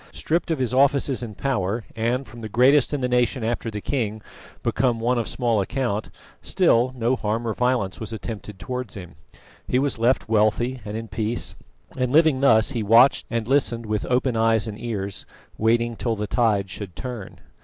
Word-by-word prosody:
Stripped 170 Hz, +2 st, -1 dB
of 160 Hz, -, 0 dB
his 130 Hz, -2 st, -1 dB
offices 140 Hz, 0 st, +3 dB
and 110 Hz, -4 st, -7 dB
power, 110 Hz, -4 st, -1 dB
and 120 Hz, +4 st, -1 dB
from 120 Hz, -, -12 dB
the 110 Hz, -1 st, -6 dB
greatest 130 Hz, +5 st, +4 dB
in 145 Hz, -2 st, -2 dB
the 125 Hz, -, +1 dB
nation, 125 Hz, 0 st, +1 dB
after 115 Hz, 0 st, -2 dB
the 105 Hz, -1 st, -5 dB
king, 110 Hz, -5 st, -2 dB, 0.4 s
become 120 Hz, -3 st, +1 dB
one 120 Hz, +2 st, +1 dB
of 115 Hz, -, -2 dB
small 115 Hz, -5 st, 0 dB
account, 115 Hz, -1 st, -2 dB, 0.3 s
still 120 Hz, +2 st, +2 dB
no 120 Hz, +1 st, +1 dB
harm 115 Hz, 0 st, -2 dB
or 110 Hz, -, 0 dB
violence 125 Hz, -6 st, 0 dB
was 110 Hz, 0 st, -5 dB
attempted 110 Hz, -2 st, -7 dB
towards 125 Hz, +3 st, -5 dB
him. 90 Hz, -4 st, -9 dB, 0.5 s
He 125 Hz, -, +1 dB
was 135 Hz, -3 st, 0 dB
left 120 Hz, +3 st, +2 dB
wealthy 110 Hz, +4 st, +1 dB
and 105 Hz, +1 st, -4 dB
in 115 Hz, 0 st, -6 dB
peace, 110 Hz, +3 st, -2 dB, 0.4 s
and 125 Hz, -1 st, 0 dB
living 155 Hz, -1 st, +4 dB
thus 125 Hz, -3 st, +4 dB
he 120 Hz, -4 st, -2 dB
watched 115 Hz, +6 st, +5 dB
and 115 Hz, -2 st, -2 dB
listened 125 Hz, -4 st, +1 dB
with 105 Hz, -1 st, -2 dB
open 125 Hz, 0 st, +1 dB
eyes 115 Hz, -1 st, +2 dB
and 105 Hz, 0 st, -6 dB
ears, 100 Hz, -5 st, -5 dB, 0.3 s
waiting 115 Hz, +1 st, +2 dB
till 115 Hz, 0 st, -1 dB
the 105 Hz, 0 st, -3 dB
tide 105 Hz, -4 st, +1 dB
should 95 Hz, -3 st, -7 dB
turn. 120 Hz, -5 st, -7 dB
115 Hz, 185 wpm, -23 LUFS, 110-125 Hz, 0.5 s, watched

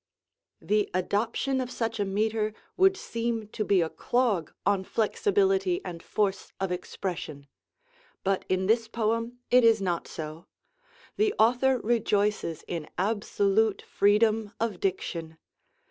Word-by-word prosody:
The 210 Hz, 0 st, +1 dB
adoption 225 Hz, +8 st, 0 dB
of 250 Hz, -, -4 dB
such 225 Hz, -3 st, -3 dB
a 205 Hz, -, +1 dB
metre 215 Hz, +2 st, 0 dB, 0.2 s
would 385 Hz, +1 st, +4 dB
seem 230 Hz, -, -3 dB
to 215 Hz, -, -3 dB
be 200 Hz, -3 st, +3 dB
a 165 Hz, -, 0 dB
clog 235 Hz, -10 st, 0 dB
on 200 Hz, -1 st, +2 dB
flexibility 385 Hz, -, +1 dB
and 170 Hz, -1 st, -6 dB
force 200 Hz, 0 st, -1 dB
of 195 Hz, -1 st, -1 dB
expression. 175 Hz, -5 st, -5 dB, 0.8 s
But 195 Hz, 0 st, 0 dB
in 185 Hz, 0 st, +1 dB
this 225 Hz, +2 st, +2 dB
poem 230 Hz, +2 st, -1 dB
it 250 Hz, 0 st, +6 dB
is 225 Hz, -1 st, +5 dB
not 180 Hz, -3 st, -2 dB
so. 155 Hz, +2 st, -7 dB, 0.7 s
The 425 Hz, 0 st, +2 dB
author 250 Hz, +3 st, +4 dB
rejoices 210 Hz, -7 st, 0 dB
in 165 Hz, -3 st, -4 dB
absolute 205 Hz, +1 st, +1 dB
freedom 215 Hz, +1 st, +2 dB
of 220 Hz, -5 st, -1 dB
diction. 165 Hz, -4 st, -3 dB
215 Hz, 130 wpm, -28 LUFS, 190-230 Hz, 0.8 s, it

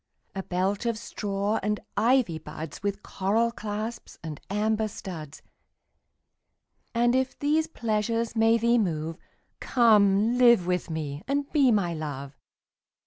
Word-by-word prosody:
A 195 Hz, -, -3 dB
belt 190 Hz, +5 st, -1 dB
of 230 Hz, -2 st, 0 dB
straw 205 Hz, -1 st, -2 dB
and 210 Hz, +1 st, -1 dB, 0.2 s
ivy 235 Hz, -9 st, +2 dB
buds 155 Hz, -1 st, -8 dB
With 200 Hz, 0 st, -3 dB
coral 220 Hz, +5 st, 0 dB
clasps 215 Hz, +1 st, -5 dB
and 155 Hz, -3 st, -6 dB
amber 215 Hz, +2 st, 0 dB
studs: 160 Hz, -7 st, -8 dB, 1.5 s
And 240 Hz, +1 st, +3 dB
if 260 Hz, 0 st, 0 dB
these 305 Hz, +2 st, +1 dB
pleasures 230 Hz, -2 st, -1 dB
may 225 Hz, +1 st, +4 dB
thee 235 Hz, +1 st, +3 dB
move, 165 Hz, -5 st, -2 dB, 0.4 s
Come 220 Hz, -1 st, +4 dB
live 235 Hz, -7 st, +6 dB
with 180 Hz, 0 st, -1 dB
me 150 Hz, -3 st, -4 dB
and 280 Hz, +1 st, 0 dB
be 275 Hz, -5 st, +4 dB
my 195 Hz, -6 st, +1 dB
Love. 140 Hz, -3 st, -6 dB
210 Hz, 130 wpm, -27 LUFS, 180-235 Hz, 1.5 s, live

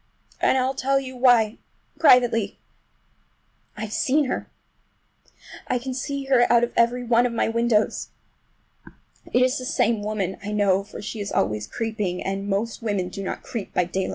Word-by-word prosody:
And -, -, +3 dB
I'll 260 Hz, +1 st, +1 dB
tell 275 Hz, +1 st, +1 dB
you 260 Hz, -1 st, -7 dB
why—privately—I've 230 Hz, -2 st, 0 dB
seen 290 Hz, +3 st, +2 dB
her! 255 Hz, -, -3 dB, 1.2 s
I 250 Hz, -, +1 dB
can 260 Hz, +2 st, -5 dB
see 275 Hz, +1 st, -3 dB
her 260 Hz, -3 st, +3 dB
out 235 Hz, 0 st, +5 dB
of 240 Hz, -, -1 dB
every 240 Hz, +1 st, +2 dB
one 240 Hz, +1 st, +3 dB
of 235 Hz, -, -6 dB
my 230 Hz, -, +1 dB
windows! 230 Hz, -1 st, +1 dB, 1.2 s
It 250 Hz, -, +4 dB
is 255 Hz, +2 st, +1 dB
the 255 Hz, -, -6 dB
same 230 Hz, -3 st, +1 dB
woman, 205 Hz, -3 st, -2 dB
I 210 Hz, +1 st, -4 dB
know, 200 Hz, -2 st, +2 dB
for 205 Hz, -, -10 dB
she 215 Hz, +1 st, -5 dB
is 200 Hz, -1 st, -4 dB
always 105 Hz, -1 st, 0 dB
creeping, 210 Hz, -, -3 dB
and 195 Hz, +1 st, -3 dB
most 215 Hz, +4 st, -2 dB
women 200 Hz, -5 st, -1 dB
do 195 Hz, -, -7 dB
not 190 Hz, -, -5 dB
creep 220 Hz, -5 st, -6 dB
by 180 Hz, -, +3 dB
daylight. 185 Hz, +2 st, -2 dB
230 Hz, 160 wpm, -24 LUFS, 205-250 Hz, 1.2 s, out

